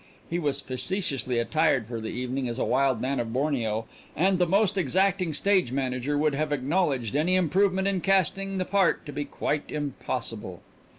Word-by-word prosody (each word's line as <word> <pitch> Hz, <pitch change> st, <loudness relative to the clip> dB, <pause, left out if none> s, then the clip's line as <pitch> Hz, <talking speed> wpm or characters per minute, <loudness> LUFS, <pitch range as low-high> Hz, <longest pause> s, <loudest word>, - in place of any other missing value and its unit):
He 170 Hz, -, 0 dB
was 145 Hz, -4 st, -1 dB
facetiously 130 Hz, -, -2 dB
attired 140 Hz, 0 st, +2 dB
for 115 Hz, 0 st, -5 dB
the 110 Hz, -, -4 dB
evening 125 Hz, +1 st, -3 dB
as 120 Hz, -, -4 dB
a -, -, 0 dB
wild 135 Hz, -4 st, +2 dB
man 135 Hz, +2 st, -1 dB
of 115 Hz, -1 st, -2 dB
Borneo, 120 Hz, -5 st, -1 dB, 0.3 s
and 185 Hz, +3 st, +2 dB
the 180 Hz, -, +3 dB
most 200 Hz, +3 st, +2 dB
exacting 190 Hz, -1 st, +1 dB
stage 185 Hz, -3 st, +2 dB
manager 130 Hz, +1 st, -1 dB
would 150 Hz, 0 st, +2 dB
have 150 Hz, +1 st, -1 dB
acknowledged 140 Hz, -, 0 dB
any 165 Hz, +5 st, +2 dB
improvement 190 Hz, +2 st, +2 dB
in 195 Hz, -2 st, 0 dB
casting 195 Hz, +1 st, +1 dB
the 185 Hz, -, 0 dB
part 195 Hz, -1 st, +2 dB
to 145 Hz, -, -6 dB
be 145 Hz, +1 st, -3 dB
quite 145 Hz, +1 st, -2 dB
impossible. 125 Hz, -, -4 dB
145 Hz, 175 wpm, -27 LUFS, 130-185 Hz, 0.3 s, the